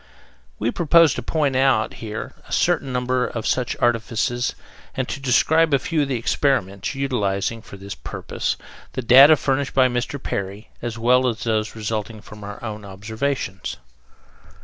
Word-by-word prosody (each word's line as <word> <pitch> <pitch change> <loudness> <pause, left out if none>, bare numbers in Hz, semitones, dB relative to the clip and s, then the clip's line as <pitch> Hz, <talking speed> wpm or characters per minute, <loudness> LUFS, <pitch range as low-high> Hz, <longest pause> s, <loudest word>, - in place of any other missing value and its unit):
We 115 +3 0
propose 165 -2 +5
to - - -4
point 145 +1 0
out 130 -5 +3
here 110 -1 -5
a - - -15
certain 135 - +1
number 125 0 0
of 115 -2 -5
such 125 -2 0
artifices 120 +1 0 0.4
and 130 -1 -1
to 140 - -4
describe 150 +4 +3
a - - +4
few 155 +3 -1
of 145 - 0
the 130 -2 -1
experiments, 115 -4 0
utilizing 115 -5 -1
for 100 - -12
this 100 +1 -7
purpose - - -4 0.4
the 130 - -3
data 135 +6 +9
furnished 135 -1 -1
by 130 -1 +5
Mr. 125 +3 -2
Perry, 100 -2 -5
as 115 -1 -4
well 125 +2 +3
as 115 -1 -2
those 110 -2 -1
resulting 110 0 -3
from 105 0 -12
our 105 0 -7
own 105 -2 -5
observations. 105 +2 -4
120 Hz, 160 wpm, -22 LUFS, 110-135 Hz, 0.4 s, data